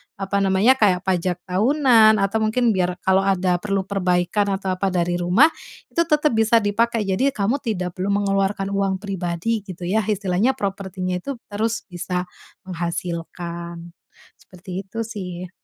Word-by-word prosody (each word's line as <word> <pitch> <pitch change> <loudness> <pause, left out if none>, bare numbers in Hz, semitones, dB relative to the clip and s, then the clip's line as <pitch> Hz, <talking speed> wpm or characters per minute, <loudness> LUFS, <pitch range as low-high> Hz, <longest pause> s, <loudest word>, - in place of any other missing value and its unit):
apa 195 0 -1
namanya, 200 +7 +3
kayak 185 -4 +3
pajak 180 -1 -1
tahunan, 225 +2 +4
atau 200 +3 +1
mungkin 225 +2 +2
biar 180 -2 0
kalau 190 +1 +3
ada 185 -2 +1
perlu 195 -1 -1
perbaikan 190 +1 0
atau 190 -1 -3
apa 185 +1 -1
dari 175 -1 0
rumah, 190 - +4 0.4
itu - - -3
tetap 300 -2 +3
bisa 225 0 +3
dipakai. 225 +2 +1
Jadi 195 +7 +1
kamu 225 +7 0
tidak 185 -8 -3
perlu 190 - -1
mengeluarkan 195 0 0
uang 195 -1 -1
pribadi 195 +2 -2
gitu 180 -1 -8
ya, 195 +5 +1
istilahnya 210 +4 +1
propertinya 190 -4 -3
itu 275 +7 -5 0.2
terus 220 +2 -1
bisa 180 +1 -3 0.4
menghasilkan. 170 -1 -5 0.5
Seperti 180 0 -13
itu 225 +4 -4
sih. 185 -5 -6
195 Hz, 145 wpm, -22 LUFS, 180-215 Hz, 0.5 s, tahunan